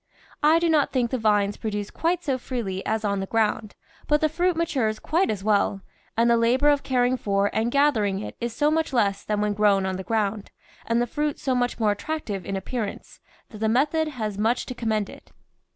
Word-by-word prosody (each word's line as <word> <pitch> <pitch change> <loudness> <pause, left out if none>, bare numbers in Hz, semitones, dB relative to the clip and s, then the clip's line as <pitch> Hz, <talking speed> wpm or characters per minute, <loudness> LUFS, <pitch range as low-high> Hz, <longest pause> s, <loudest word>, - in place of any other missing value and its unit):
I 310 +2 +5
do 340 0 +1
not 310 -3 +2
think 245 -3 0
the 260 - -1
vines 205 -2 +2
produce 210 -2 -4
quite 345 +1 -1
so 265 -3 -1
freely 215 -7 -4
as 220 0 -1
on 200 -1 0
the 195 - -3
ground, 220 -1 0 0.3
but 295 0 +3
the 310 - +2
fruit 350 +2 0
matures 260 -10 0
quite 340 - 0
as 205 -3 -3
well, 205 -2 +1 0.4
and 230 +1 +4
the 235 0 +4
labour 250 +5 +3
of 290 -1 +3
caring 255 -1 +1
for 200 -2 0
and 225 +2 +1
gathering 235 -8 +2
it 210 - -7
is 235 0 -2
so 295 +6 +1
much 320 -2 0
less 200 -5 +1
than 210 -1 -1
when 210 0 +1
grown 200 -2 +3
on 190 -1 -2
the 190 - -5
ground, 210 0 -1 0.4
and 235 +1 +2
the - - 0
fruit 295 +4 -2
so 265 - -1
much 245 -1 0
more 215 -2 +3
attractive 205 - -4
in 195 - -2
appear 215 +4 -3
ance, 200 - -10 0.3
that 215 - -10
the 220 0 +1
method 305 +7 +2
has 215 -8 -4
much 225 +4 +1
to - - -5
commend 220 -4 -1
it. - - -14
230 Hz, 220 wpm, -25 LUFS, 205-280 Hz, 0.4 s, I